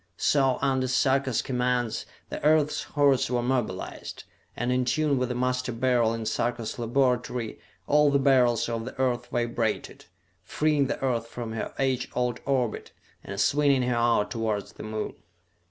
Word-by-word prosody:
So, 135 -3 +2
under 130 -1 +1
Sarka's 130 -1 +1
commands, 125 -2 -1 0.2
the - - -6
Earth's 150 0 +3
hordes 140 -3 +2
were 120 -1 0
mobilized; 120 -7 -3 0.3
and 120 +1 -1
in 125 0 +2
tune 140 +2 +1
with 125 0 -1
the 125 - -2
Master 125 +1 -1
Beryl 120 -1 +2
in 115 -1 -4
Sarka's 120 +1 -2
laboratory 125 -1 0 0.3
all 150 +3 +4
the 140 - +3
Beryls 130 -4 +3
of 115 -1 -3
the 130 - -8
Earth 125 -2 0
vibrated, 120 -2 -2 0.4
freeing 150 -3 +1
the 145 - -3
Earth 120 -3 0
from 115 -1 -6
her 110 - -4
age 130 -2 0
old 125 -1 0
orbit 125 -5 -1 0.3
and 100 0 -6
swinging 140 -1 +3
her 125 0 0
out 115 -3 +2
towards 110 -3 -2
the - - -11
Moon. 110 0 -4
125 Hz, 155 wpm, -27 LUFS, 120-135 Hz, 0.4 s, all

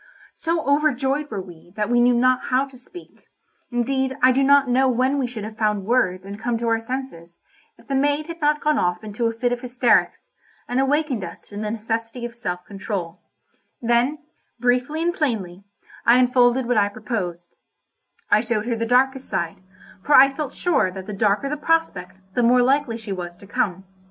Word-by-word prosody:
So 330 -1 -1
overjoyed 285 0 +1
were 200 -3 -4
we 175 -1 -15
that 210 -1 -1
we 240 0 +3
knew 245 0 +4
not 255 +1 +2
how 260 +2 +1
to 270 -1 -16
speak; 340 +8 -14 0.4
indeed 265 +2 -1
I 255 - +7
do 265 +2 +2
not 280 0 +5
know 260 +2 +3
when 260 +3 +1
we 260 - 0
should 230 -3 -7
have 215 +1 -8
found 210 -3 0
words 190 -6 +1
and 200 +1 -8
come 240 0 -1
to 235 +1 -3
our 225 0 +2
senses, 225 -9 -7 0.4
if - - -20
the 275 - -3
maid 290 +2 +1
had 335 0 -9
not 300 0 +2
gone 300 -1 +2
off 180 +1 -1
into 215 +2 -2
a - - 0
fit 245 +2 -1
of 245 - -5
hysterics, 250 - +1 0.4
and 245 - -1
awakened 270 -4 0
us 170 -1 -8
to 205 - -11
the 210 +1 -3
necessity 225 +2 -4
of 240 - -6
self 180 -7 -5
control; 195 -4 -5 0.6
then, 240 +5 +1 0.4
briefly 250 +6 +1
and 345 +1 +1
plainly, 200 - -3 0.4
I 235 +1 +5
unfolded 250 0 +3
what 245 -1 +1
I 205 -1 +3
proposed; 185 -6 -5 0.8
I 215 - +5
showed 225 -2 -2
her 235 -1 -1
the 230 0 -2
darkest 265 +2 +2
side, 170 -1 -2 0.4
for 290 +8 +3
I 275 +1 +7
felt 290 -2 -4
sure 315 - +1
that 190 0 -8
the 210 - -6
darker 205 +5 +1
the 300 +2 -3
prospect 290 - 0 0.2
the 245 - +1
more 245 +1 +4
likely 265 -2 +1
she 220 -3 -8
was 175 -2 -5
to 200 - -15
come. 190 -1 -2
245 Hz, 195 wpm, -22 LUFS, 210-270 Hz, 0.8 s, I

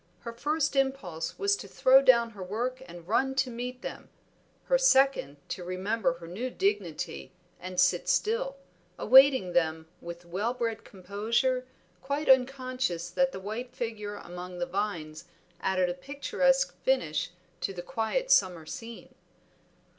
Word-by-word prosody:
Her 235 - -6
first 295 +4 -1
impulse 265 -13 -1
was 400 0 +2
to - - -9
throw 265 +1 +5
down 235 -3 +5
her 205 -3 -11
work 240 +7 -3
and 175 -1 -11
run 265 +5 +1
to 260 -1 +1
meet 250 +1 -6
them, - - -7 0.5
her - - +2
second 270 - +3
to 180 - -4
remember 185 +2 -1
her 170 0 -11
new 220 +10 -4
dignity 185 -8 -2 0.3
and 185 0 -5
sit 180 -1 +3
still, - - +1 0.4
awaiting 260 -8 +6
them 160 -1 +1
with 170 0 -8
well 205 +8 -2
bred 230 -2 -2
composure, 225 +7 -1 0.3
quite 280 +3 -3
unconscious 255 -8 +2
that 270 0 +2
the 190 - -7
white 230 +6 -6
figure 215 -4 -4
among 180 -1 -8
the 175 - -1
vines 175 -5 -4 0.3
added 185 -1 +1
a 175 - -1
picturesque 395 - 0
finish 170 - 0 0.3
to 180 +2 -2
the 175 -2 -7
quiet 265 - -1
summer 180 -5 +3
scene. 230 - -9
225 Hz, 145 wpm, -29 LUFS, 180-265 Hz, 0.5 s, awaiting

